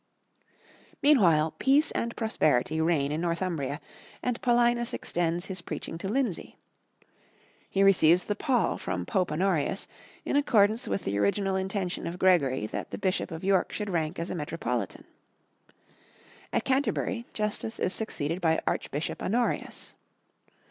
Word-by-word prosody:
Meanwhile, 170 - +5
peace 280 +4 +4
and 235 0 -2
prosperity 160 - +1
reign 155 -4 +1
in 155 +2 -2
Northumbria, 170 -5 -2 0.4
and 250 -1 -1
Paulinus 240 -1 +2
extends 175 0 -1
his 190 -2 -5
preaching 165 -1 -6
to 190 - -4
Lindsey. 230 -4 -2 1.1
He 195 - 0
re 195 - +8
receives 175 -1 +5
the 205 - -1
pall 250 0 +1
from 90 -1 -3
Pope 180 - 0
Honorius, 180 +2 0 0.4
in - - -1
accordance 225 -4 +3
with 195 - -2
the 100 +1 -1
original 190 - +1
intention 190 -1 -2
of 170 +1 -5
Gregory 140 - +3
that - - -5
the - - -5
Bishop 185 -1 -1
of 165 -1 -7
York 190 -1 +2
should 210 -2 -4
rank 160 -1 -1
as 170 +2 -4
a - - -3
metropolitan. 165 +1 -3 1.5
At - - 0
Canterbury, 260 -3 0
Justus 215 +1 -2
is 185 - 0
succeeded 170 -5 -2
by 160 -1 +3
Archbishop 150 +3 -2
Honorius. 235 +5 -1
185 Hz, 140 wpm, -28 LUFS, 160-220 Hz, 1.5 s, re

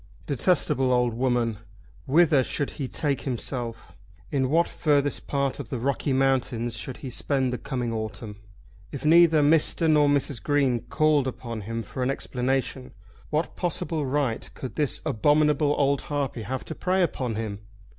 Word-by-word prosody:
Detestable 140 -3 +1
old 125 -1 +2
woman! 120 -3 0 0.5
Whither 150 -1 +4
should 145 +2 -2
he 140 -4 -5
take 140 0 -1
himself? 120 -2 -4 0.4
In 130 -2 +1
what 165 +4 +3
furthest 145 -2 0
part 140 -1 -1
of 130 -6 -7
the 130 - -3
Rocky 135 +3 -1
Mountains 130 -3 +1
should 120 +4 -5
he 130 - -5
spend 130 0 0
the 125 - -3
coming 125 -4 -3
autumn? 110 -1 -5 0.5
If 140 - -6
neither 160 -1 +6
Mr. 160 +2 +3
nor 150 -2 +4
Mrs. 140 -4 +1
Green 140 -5 +1
called 145 +3 +1
upon 120 -3 -5
him 115 +3 -4
for 130 - -7
an 125 - +1
explanation, 130 0 -2 0.4
what 155 +2 -1
possible 160 -4 -2
right 135 -4 -1
could 130 - -6
this 150 -5 0
abominable 150 +4 +2
old 140 -1 +2
harpy 140 -5 -3
have 130 +5 -4
to - - -5
prey 185 +3 +1
upon 130 -8 -2
him? 105 -2 -4
135 Hz, 155 wpm, -25 LUFS, 120-150 Hz, 0.5 s, neither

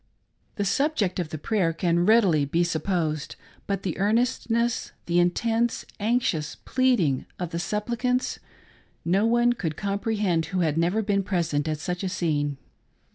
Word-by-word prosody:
The 205 - -1
subject 230 - +1
of 170 -3 -2
the 155 - -5
prayer 175 0 0
can 175 +1 +1
readily 195 -10 +5
be 165 +5 +1
supposed; 160 -2 -1 0.3
but 195 -1 -2
the 185 -2 -3
earnestness 235 +2 +1
— - - -41
the 175 0 +2
intense, 225 +7 +1
anxious, 205 -9 0
pleading 235 - +1
of 175 -2 -4
the 170 - -2
supplicants 235 +6 -1 0.3
— - - -29 0.3
no 195 +6 +3
one 240 +1 +3
could 165 -10 -4
comprehend 200 -4 0
who 185 -1 -1
had 155 -3 +1
never 175 +7 +1
been 200 -1 +1
present 170 -6 -1
at 155 -1 -1
such 180 +5 -4
a 190 - -1
scene. 145 -5 -1
185 Hz, 155 wpm, -25 LUFS, 165-225 Hz, 0.3 s, readily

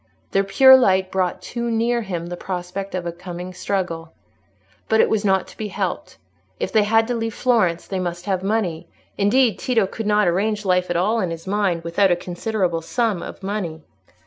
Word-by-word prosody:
Their 195 - +2
pure 265 +7 +7
light 190 -7 +3
brought 185 -2 -1
too 235 -1 -3
near 235 +1 +1
him 180 -5 -4
the 175 +1 -5
prospect 185 +2 -5
of 180 -1 -3
a 170 - -2
coming 180 +1 -8
struggle. 175 -4 -3 0.8
But 220 - +3
it - - +4
was 220 -1 +1
not 190 -2 +2
to - - -15
be 215 - -3
helped; - - -4 0.4
if - - -2
they 220 - +4
had 225 +1 +3
to - - +1
leave 225 -2 -3
Florence, 210 -9 +1
they 190 - -3
must 175 0 -4
have 190 -2 0
money; 190 -5 -1 0.3
indeed, 215 +1 +2
Tito 230 -5 +2
could 210 +3 -5
not 210 -2 +3
arrange 205 +4 0
life 180 -1 +2
at 175 - 0
all 215 +6 +1
to 185 - 0
his 165 -1 -6
mind 190 -4 0
without 170 +4 +2
a 175 - +4
considerable 175 0 -2
sum 220 +1 -1
of - - -9
money. 185 -6 -4
195 Hz, 200 wpm, -21 LUFS, 175-220 Hz, 0.8 s, pure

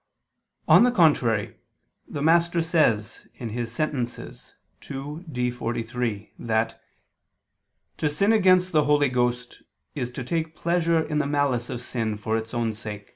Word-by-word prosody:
On - - +7
the 250 - +5
contrary, 140 - +2 0.5
The 145 - -4
Master 170 +2 +3
says 155 -10 +1 0.4
(Sent. 125 0 -2
ii, 145 +4 -10
D, 125 -2 -1
43) 115 -2 -3
that 115 0 -1 1.2
"to 150 - 0
sin 200 +9 +2
against 185 -3 +4
the 150 -2 +3
Holy 145 -1 +3
Ghost 125 0 -1 0.3
is 125 -5 -3
to 125 +1 -6
take 160 +4 -2
pleasure 170 -1 +1
in 150 -1 -1
the 150 - 0
malice 140 -5 0
of 125 - -5
sin 110 -4 -2
for 110 +1 -2
its 110 0 -3
own 115 -2 -1
sake." 105 -2 -8
130 Hz, 135 wpm, -25 LUFS, 115-160 Hz, 1.2 s, On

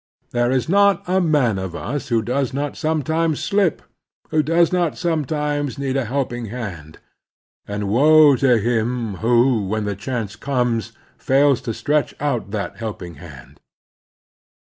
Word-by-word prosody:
There 120 0 +1
is 130 +1 0
not 200 +2 +3
a 185 +1 +2
man 140 - +2
of 95 -2 -5
us 145 +3 -4
who 115 -2 +1
does 130 +2 -1
not 145 0 -2
sometimes 160 0 0
slip, 200 -5 0 0.5
who 155 -1 +3
does 165 +3 +2
not 175 -3 0
sometimes 150 -4 -1
need 135 -1 -2
a 135 -3 0
helping 120 -1 -2
hand; 95 -10 -7 0.7
and 100 0 -3
woe 145 +6 +6
to 125 -2 +4
him 115 -1 -1
who, 120 -2 +2
when 110 +1 -2
the 100 -1 -2
chance 105 -1 -4
comes, 120 -3 -1 0.3
fails 140 -1 +3
to 115 - -4
stretch 150 0 0
out 140 -8 -2
that 105 -1 -4
helping 100 -7 -6
hand. 70 -7 -13
130 Hz, 145 wpm, -21 LUFS, 110-150 Hz, 0.7 s, woe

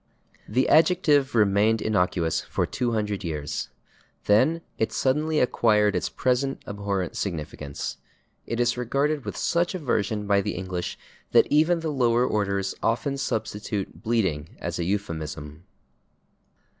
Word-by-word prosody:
The 125 +5 +2
adjective 150 -6 +4
remained 105 +1 +3
innocuous 90 -6 +1
for - - -1
200 105 -5 -2
years. 75 -4 -3 0.6
Then 130 +11 +3 0.2
it 110 0 +1
suddenly 150 +4 +1
acquired 105 -4 +3
its 90 - -1
present 130 +2 0
abhorrent 100 -3 -3
significance. 75 -5 -4 0.5
It 115 - -2
is 120 0 +2
regarded 140 +4 0
with - - -5
such 175 +2 +1
aversion 110 - -1
by 100 -1 +3
the - - -3
English 90 -1 -4 0.4
that - - +7
even 160 +3 +3
the 160 -1 -2
lower 120 -3 +3
orders 100 -3 0
often 120 +5 0
substitute 105 -5 -3
/bleeding/ 95 -10 -1
as - - -4
a 85 - -1
euphemism. 80 -5 -4
110 Hz, 125 wpm, -25 LUFS, 95-135 Hz, 0.6 s, that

